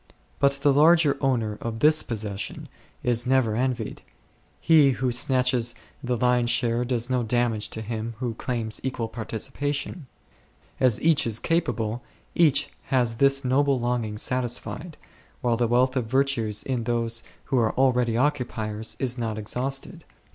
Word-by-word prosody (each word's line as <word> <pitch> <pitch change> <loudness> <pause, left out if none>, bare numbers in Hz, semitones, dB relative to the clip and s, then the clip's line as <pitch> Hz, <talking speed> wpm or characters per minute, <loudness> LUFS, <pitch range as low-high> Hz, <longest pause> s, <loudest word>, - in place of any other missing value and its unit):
But 140 0 +4
the 140 0 +2
larger 155 0 +5
owner 115 -6 0
of 115 -1 -4
this 155 +5 +5
possession 105 -3 -5 0.3
is 120 0 0
never 130 -4 +2
envied; 125 -2 -2 0.6
he 150 -5 +5
who 130 -1 0
snatches 125 -1 +1 0.3
the 125 -1 -1
lion's 125 0 +2
share 120 0 +1
does 120 -1 -1
no 130 -1 0
damage 115 -2 0
to 110 - -5
him 115 +1 -4
who 120 -1 -3
claims 115 -2 -3
equal 130 -3 -2
participa 125 +6 -4
tion; 145 +1 -5 0.7
as 125 -4 +3
each 155 -6 +4
is 110 -2 -1
capable 125 -10 -1 0.3
each 155 -5 +3
has 125 -4 +1
this 135 +1 +3
noble 135 +1 +2
longing 120 -3 -2
satisfied, 130 +7 -3 0.4
while 120 -3 +1
the 120 0 +1
wealth 125 +3 +2
of 125 -4 -1
virtues 120 -5 +1
in 125 -4 -2
those 115 -1 0 0.3
who 130 - +4
are 110 -2 +1
already 125 -3 +2
occupiers8 115 -5 -1
is 125 -1 -1
not 110 -2 -2
exhausted. 130 +6 -3
125 Hz, 145 wpm, -25 LUFS, 115-135 Hz, 0.7 s, larger